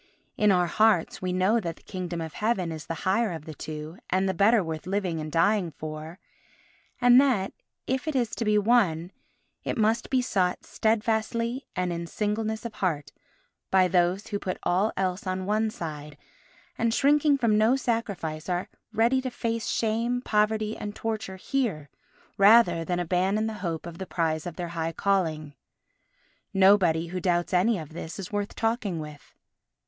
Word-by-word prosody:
In 210 -1 +4
our 180 -2 +3
hearts 215 -1 +2
we 185 -1 -1
know 185 +6 +2
that 170 -6 -4
the - - -22
Kingdom 180 -3 -5
of 160 -1 -6
Heaven 205 -6 0
is 155 -2 -7
the 165 - -3
higher 205 +3 +2
of 160 -2 -7
the 155 - -7
two 155 +3 -7
and 190 +1 +1
the 190 - +1
better 205 +3 +4
worth 160 +1 -5
living 185 -4 -1
and 155 0 -5
dying 175 +3 +2
for, 155 +2 -7 0.8
and 245 +1 +7
that, 240 -9 +1 0.3
if 260 +4 -2
it 310 - -1
is 240 -4 +1
to - - -3
be 210 -1 +3
won, 200 -6 +2 0.5
it - - -3
must 220 +1 +1
be 260 - +2
sought 190 -8 0
steadfastly 230 +3 0
and 180 -1 -1
in 170 0 -4
singleness 215 +3 -2
of 230 - -5
heart 150 -9 -2 0.6
by 185 -1 +4
those 180 +2 +1
who 205 -2 -2
put 185 -2 -3
all 190 +5 +2
else 185 +1 -1
on 185 0 -2
one 215 +2 +1
side 150 -6 -7 0.6
and, 230 0 +1
shrinking 290 +1 +4
from 230 -5 +2
no 220 +4 +4
sacrifice, 200 -11 -2
are 180 0 -1 0.2
ready 230 +4 +2
to 260 - -3
face 230 -2 -3
shame, 230 +2 0
poverty 215 -2 +1
and 205 0 -6
torture 220 -4 -3
here 190 - -2 0.5
rather 200 -5 +6
than 175 +1 -1
abandon 185 +5 +1
the 220 - -2
hope 165 -4 -3
of 170 -1 -8
the 190 - -5
prize 160 -1 -1
of 170 - -6
their 175 -2 -4
high 165 -1 -3
calling. 160 -6 0 1.0
Nobody 185 -4 +4
who 185 +1 -3
doubts 175 0 0
any 200 +5 +3
of 155 -4 -7
this 165 0 -7
is 195 -3 -7
worth 205 -1 -3
talking 225 -6 -1
with. 150 -1 -10
190 Hz, 175 wpm, -27 LUFS, 170-220 Hz, 1.0 s, and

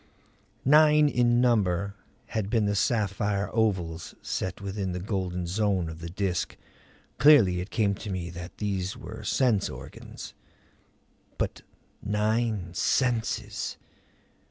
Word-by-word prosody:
Nine 150 +1 +6
in 120 -3 +3
number 100 -5 +2 0.4
had 105 -3 -2
been 110 -2 +2
the 100 - +1
sapphire 100 -1 0
ovals 90 -7 0
set 95 -1 -3
within 100 -2 -3
the 90 - -3
golden 90 -2 -2
zone 95 -2 0
of 80 0 -8
the 85 0 -6
Disk. 90 0 -2 0.6
Clearly 110 -13 +6
it 90 - -7
came 105 -3 +1
to 105 +1 -7
me 90 -3 -3
that 90 0 -9
these 95 -3 -2
were - - -8
sense 120 -7 +2
organs! - - -9 1.0
But - - -2 0.4
nine 105 -3 0
senses! 120 +4 0
100 Hz, 120 wpm, -27 LUFS, 90-110 Hz, 1.0 s, Nine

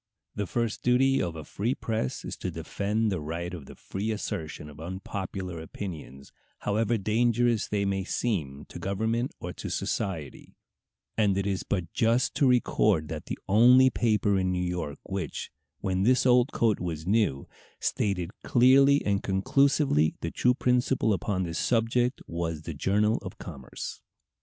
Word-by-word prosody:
The 105 -2 -3
first 115 0 -2
duty 135 +2 +3
of 85 -2 -2
a 80 - -6
free 115 - -2
press 110 - -3
is - - -4
to 95 - -3
defend 100 +6 -1
the 90 -5 -2
right 85 +4 -4
of 80 -7 -8
the - - -11
free 100 +3 -4
assertion 95 -8 -4
of 75 -1 -12
unpopular 95 0 -5
opinions, 80 -5 -8 0.3
however 110 +2 +1
dangerous 115 +2 +2
they 100 -1 0
may 95 -1 0
seem 80 - -2
to - - -8
government 110 +6 -1
or - - -5
to - - -6
society; 80 -8 -3 0.6
and 100 -3 +3
it 100 - 0
is 100 -2 -1
but 90 -4 -3
just 115 +2 +2
to 140 - +4
record 105 -9 +2
that 75 -2 -6
the - - -4
only 125 +6 +6
paper 105 -5 +2
in 95 -1 0
New 90 0 -1
York 90 -5 -3
which, 95 -7 -4 0.3
"when 95 -1 0
this 125 +6 +3
old 125 +1 +4
coat 110 -3 +2
was 80 -3 -4
new," 100 -9 +1 0.3
stated 95 -4 -1
clearly 135 +3 +5
and 100 -1 +1
conclusively 95 - +2
the 85 - -3
true 125 0 +2
principle 125 -3 +2
upon 95 -1 -1
this 85 -2 -3
subject 120 +2 +1
was 85 -2 -3
the 80 - -5
Journal 105 +9 +2
of 95 -2 -8
Commerce. 70 -7 -8
100 Hz, 160 wpm, -28 LUFS, 85-115 Hz, 0.6 s, only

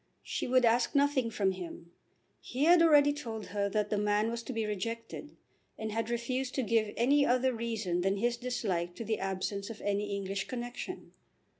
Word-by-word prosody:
She - - -3
would 255 0 +4
ask 235 +5 +2
nothing 280 -4 +3
from 200 -3 +1
him. 175 -2 -8 0.5
He 260 +3 -3
had 340 +2 +7
already 290 -3 +6
told 225 -7 -6
her 200 -1 0
that 210 0 -1
the 210 - +1
man 210 +2 +1
was 235 0 -3
to 235 - -6
be 225 -3 -1
rejected, 230 +7 -5 0.4
and 220 0 -4
had 225 +1 -2
refused 250 +2 -2
to 265 - +1
give 220 -2 +1
any 280 +5 +4
other 255 0 +2
reason 220 -6 -2
than 195 +2 +1
his 240 +4 +1
dislike 195 -8 -2
to 230 - -6
the 220 0 -1
absence 195 +1 -3
of 225 - -8
any 205 0 -1
English 195 0 -3
connexion. 245 +8 -6
225 Hz, 185 wpm, -31 LUFS, 205-250 Hz, 0.5 s, had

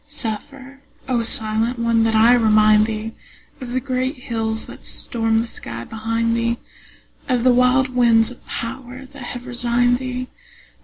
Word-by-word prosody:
Suffer, 275 +1 -6 0.3
O 250 -3 +1
silent 225 +1 0
one, 230 -1 +2
that 225 0 +1
I 225 +3 +6
remind 215 -2 +5
thee 220 0 -4 0.5
Of 250 - -6
the 255 +1 0
great 260 +1 -2
hills 225 -3 -3
that - - -12
stormed 225 -1 0
the - - -7
sky 115 - -7
behind 230 - -1
thee, 235 0 0 0.7
Of 250 -2 +1
the 255 -1 +5
wild 250 +1 +3
winds 235 -2 +3
of 245 - -14
power 255 +2 -6
that 280 +1 -13
have 245 0 -6
resigned 245 0 +1
thee. 255 -1 -4
235 Hz, 155 wpm, -20 LUFS, 225-255 Hz, 0.7 s, I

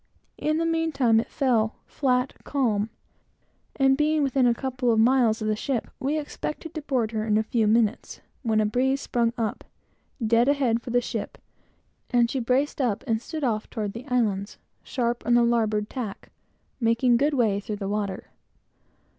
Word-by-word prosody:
In 305 +1 0
the 330 - 0
meantime, 320 -9 +2
it 225 - -3
fell 235 -6 +1
flat 250 -2 0
calm, 220 -7 0 0.9
and 270 -1 +4
being 300 +1 +2
within 265 -2 +2
a 240 - +4
couple 255 -1 -1
of 220 - +2
miles 230 -2 +3
of - - -1
the 215 - +1
ship, 240 +2 -3
we 285 +4 0
expected 305 +2 -5
to 310 - -4
board 250 -6 -1
her 215 -1 -2
in 215 -1 +2
a 220 - +2
few 220 0 +1
moments, 220 +1 +1 0.2
when 220 -4 +1
a - - +4
sudden 210 - +1
breeze 265 +4 +1
sprung 235 -2 0
up, 225 -3 -2 0.6
dead 230 +2 +3
ahead 260 -5 +2
for 250 - -8
the 245 +1 +2
ship, 225 -4 -5 0.7
and 240 -1 +3
she 270 - -1
braced 260 +5 0
up 235 -4 0
and 225 -3 0
stood 315 +2 -6
off 220 -4 -1
toward 210 -4 -4
the 235 +4 -9
islands, 215 -6 0 0.2
sharp 240 -2 -2
on 240 - +3
the 240 - +5
larboard 220 -3 +1
tack, 220 -6 -6 0.5
making 235 +1 +3
good 285 +4 +2
way 215 -6 +2
through 210 +1 -5
the 200 -1 -5
water. 200 -2 -3
240 Hz, 180 wpm, -25 LUFS, 220-270 Hz, 0.9 s, the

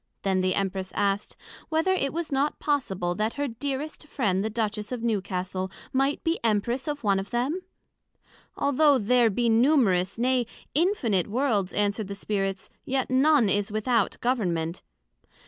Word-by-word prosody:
Then 190 -1 +1
the 185 0 +1
Empress 190 -1 -2
asked, 200 0 -1 0.3
Whether 325 +4 +2
it 275 -7 0
was 330 -1 -4
not 280 +2 +1
possible 190 -12 -1
that 215 +5 -1
her 285 0 -1
dearest 280 +5 -4
friend 200 -10 0
the 220 - -1
Duchess 215 -1 -2
of 245 -2 -4
Newcastle, 190 -4 -2 0.2
might 270 +2 +1
be 330 +1 0
Empress 235 +5 0
of 290 -2 -3
one 200 -2 +3
of 195 +1 -6
them? 265 +10 -1 1.0
Although 285 0 +4
there 240 +1 +3
be 235 +4 0
numerous, 225 - +3
nay, 250 0 +1 0.3
infinite 270 - +1
Worlds, 215 -5 0
answered 205 0 0
the 200 - -5
Spirits, 195 -1 -3
yet 260 -1 -1
none 270 -2 +4
is 205 +2 +1
without 215 0 +1
Government. 180 -9 -1
225 Hz, 150 wpm, -26 LUFS, 195-270 Hz, 1.0 s, Although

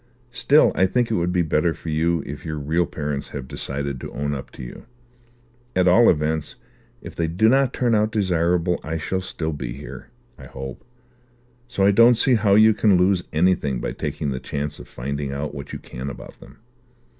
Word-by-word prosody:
"Still 135 +6 +4
I 95 - +3
think 120 +3 0
it - - +1
would 90 -2 0
be 90 -1 +2
better 80 +1 +1
for 80 - -8
you 80 +2 +1
if 75 - -7
your 80 -2 -4
real 80 +4 0
parents 75 -2 -4
have 70 -3 -7
decided 70 0 -4
to - - -7
own 70 0 -2
up 65 - -6
to - - -9
you. - - -10 0.9
At 90 0 +3
all 115 +7 +6
events, 75 -1 0 0.5
if - - -8
they 85 - -1
do 90 +7 +2
not 135 +2 +3
turn 120 -2 0
out 105 0 +2
desirable, 90 -3 +1
I 80 +1 -3
shall 95 +4 -2
still 80 -3 -4
be 65 -5 -5
here, 65 -1 -10 0.3
I - - -10
hope; 65 -1 -8 0.8
so 120 -6 -1
I 100 - +6
don't 115 +4 +6
see 125 +3 +3
how 105 -3 +3
you 110 +1 +6
can 105 -2 +3
lose 90 0 +3
anything 80 -6 +1
by - - -3
taking 70 - -3
this 65 -1 -4
chance 75 +1 -4
of - - -11
finding 70 +3 -4
out 70 +2 -4
what 70 +1 -8
you - - -5
can 65 +3 -7
about 70 - -11
them." - - -15
80 Hz, 200 wpm, -22 LUFS, 70-100 Hz, 0.9 s, all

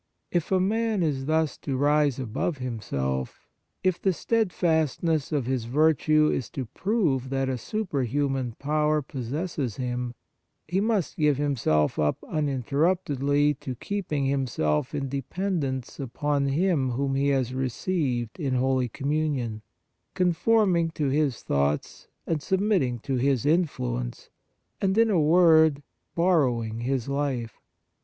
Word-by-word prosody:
If 175 0 -1
a 190 - +4
man 215 +1 +1
is 140 -4 -1
thus 160 -1 +1
to 135 -3 -3
rise 145 -1 +3
above 130 +6 -2
himself, 70 - -3 0.4
if 185 -2 +1
the 190 - +2
steadfastness 165 - 0
of 145 -5 0
his 130 -2 -1
virtue 155 +3 +3
is 125 - -3
to 130 - -2
prove 150 - 0
that 135 0 0
a 130 - 0
superhuman 135 - -1
power 150 +1 +1
pos 130 -2 -6
sesses 145 - -3
him, 125 -1 -3 0.5
he 180 +4 0
must 210 -5 0
give 150 -3 +3
himself 120 - +1
up 75 -1 +1
uninterruptedly 145 0 +1
to 130 - -5
keeping 155 - -2
himself 130 - 0
in 140 -1 -2
dependence 140 -1 -3
upon 140 +2 -1
Him 145 -2 +1
whom 135 +2 -1
he 135 +1 +1
has 130 -3 +1
received 130 -2 -2
in 135 -5 -1
Holy 130 -1 +1
Communion, 140 -6 -2 0.5
con 180 -1 +2
forming 185 -4 +3
to 145 -3 0
His 140 -3 0
thoughts 70 +1 -1 0.2
and 160 -3 -1
submit 195 +5 +2
ting 125 -2 -1
to 135 0 -2
His 130 -1 +1
influence, 60 - -1 0.5
and, 195 +1 +1
in 225 -1 +4
a 175 -5 +3
word, 160 -2 +5 0.3
borrowing 125 -11 +1
His 125 0 -1
life. 140 -5 -2
140 Hz, 135 wpm, -26 LUFS, 130-165 Hz, 0.5 s, word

